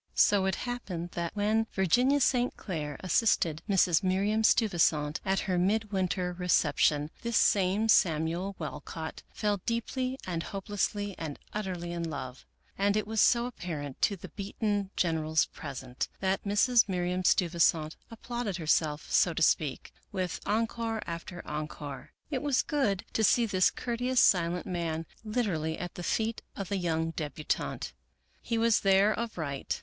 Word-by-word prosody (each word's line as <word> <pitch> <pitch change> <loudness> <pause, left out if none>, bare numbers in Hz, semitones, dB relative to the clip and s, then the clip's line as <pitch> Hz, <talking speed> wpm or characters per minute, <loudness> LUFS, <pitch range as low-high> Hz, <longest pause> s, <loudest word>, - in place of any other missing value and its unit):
So 195 -2 +4
it 190 - +1
happened 185 -9 -4
that, 170 +1 -4
when 215 +2 +1
Virginia 245 - +3
St. 250 -1 +2
Clair 150 -6 -4
assisted 180 -4 +2
Mrs. 185 -3 +4
Miriam 200 +3 +1
Steuvisant 165 -9 +3
at 195 -1 +1
her 185 -3 0
midwinter 190 -2 0
recep 175 -4 +1
tion, 150 0 +2
this 235 -1 0
same 200 +2 +3
Samuel 170 0 +2
Walcott 160 +1 -6
fell 210 -1 0
deeply 255 +3 -1
and 170 -3 -2
hopelessly 205 +1 -2
and 155 -3 -5 0.2
utterly 185 -5 -3
in 170 -1 -3
love, 135 -3 -7 0.3
and 200 +1 +2
it 215 - 0
was 220 0 +1
so 235 0 +4
apparent 155 - -6
to 200 - +3
the 180 - -10
beaten 205 0 -2
generals 160 -2 +1
present, 130 -3 -6
that 190 +1 0
Mrs. 215 +3 +4
Miriam 180 0 -1
Steuvisant 170 -3 +2
applauded 230 -3 -4
herself, 155 -2 +1
so 170 -3 +3
to 165 - +1
speak, 150 -4 +1 0.2
with 185 -3 -2
encore 225 +1 -1
after 170 +1 -6
encore. 150 -3 -6 0.2
It 265 - -1
was 285 -3 +2
gop.d 215 -10 0
to 220 - +1
see 235 +3 +4
this 185 -4 +3
courteous, 245 +1 -1
silent 175 -3 +3
man 165 -3 -2 0.2
literally 195 -9 -1
at 175 -1 -5
the - - -7
feet 220 +5 -1
of 195 -2 -5
the 200 -1 -1
3 175 - -1
oung 165 0 -1
debutante. 150 0 -3 0.5
He 230 - -2
was 230 -1 +4
there 195 +2 +4
of 230 -2 -4
right. 140 -4 -3
185 Hz, 150 wpm, -30 LUFS, 165-215 Hz, 0.5 s, So